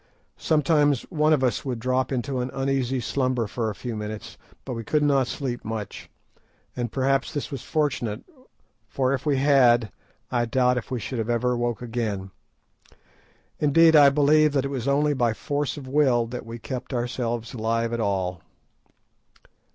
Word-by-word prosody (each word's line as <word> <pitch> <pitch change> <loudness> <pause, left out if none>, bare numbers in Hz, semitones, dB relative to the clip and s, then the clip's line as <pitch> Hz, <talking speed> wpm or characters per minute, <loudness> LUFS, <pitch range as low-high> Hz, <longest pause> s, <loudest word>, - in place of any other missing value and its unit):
Sometimes 145 -3 +2
one 155 -2 +2
of 145 -4 +3
us 125 -4 0
would 130 -3 -3
drop 130 +3 0
into 130 +1 -2
an 125 +1 -2
uneasy 135 -1 0
slumber 130 -1 0
for 110 +1 -2
a 105 - -5
few 120 +1 -5
minutes, 105 0 -6 0.3
but 130 - -4
we 115 -1 -5
could 150 +6 +1
not 140 -3 +3
sleep 125 -2 -4
much, 110 -2 -6 0.7
and 120 -3 -3
perhaps 135 0 0
this 145 - -4
was 135 -3 -5
fortunate, 125 -8 -1 0.6
for 130 0 0
if 140 +2 -3
we 140 -2 +2
had 125 -5 +4 0.4
I 120 -1 +1
doubt 125 +1 +2
if - - -12
we 125 - -2
should 120 +2 -4
have 110 +1 -2
ever 125 +1 +1
woke 120 -1 -2
again. 110 -5 -3 1.3
Indeed, 160 +2 +5
I 145 -2 +8
believe 150 +1 +4
that 135 -1 +1
it - - -2
was 135 -2 -4
only 145 +2 +2
by 120 -4 +1
force 145 +3 -2
of 135 -3 -8
will 130 -4 +3
that 120 0 -7
we 115 +1 -6
kept 130 +2 -6
ourselves 120 -1 -3
alive 115 0 -1
at 115 - -2
all. 95 -5 -1
125 Hz, 170 wpm, -25 LUFS, 115-140 Hz, 1.3 s, I